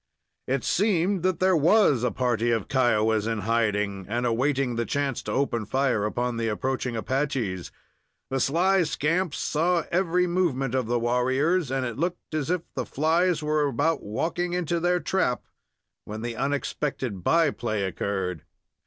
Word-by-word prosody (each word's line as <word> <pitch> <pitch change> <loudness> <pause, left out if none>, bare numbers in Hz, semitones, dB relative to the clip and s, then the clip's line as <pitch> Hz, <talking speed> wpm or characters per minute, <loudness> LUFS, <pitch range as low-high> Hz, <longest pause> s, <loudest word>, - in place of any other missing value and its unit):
It 130 -1 0
seemed 190 -1 +1
that 185 -1 0
there 185 0 +4
was 160 - +4
a 125 - +2
party 120 -2 0
of 115 -4 0
Kiowas 110 -4 +2
in 115 -2 -1
hiding, 105 -3 0
and 120 +3 -1
awaiting 130 +1 +1
the 115 - 0
chance 140 +1 -1
to - - -5
open 125 -5 0
fire 130 -5 +1
upon 120 +2 -2
the 115 0 -1
approaching 125 +2 -2
Apaches. 120 - -2 0.6
The 135 - 0
sly 180 +8 +3
scamps 165 +1 0
saw 170 +2 +1
every 180 0 +2
movement 165 -8 0
of 130 -3 0
the 120 +1 +1
warriors, 130 +7 +1
and 135 -1 -1
it 120 0 -5
looked 175 0 -3
as 155 -2 -1
if 180 -2 0
the - - -2
flies 165 +2 +1
were 150 -1 +1
about 145 +4 0
walking 175 +11 -2
into 175 -1 0
their 180 +1 +2
trap 175 -10 0 0.6
when 110 +1 -6
the 120 -1 -3
unexpected 135 - -2
by 165 - +3
play 110 -6 -2
occurred. 95 -3 -2
135 Hz, 160 wpm, -26 LUFS, 115-165 Hz, 0.6 s, there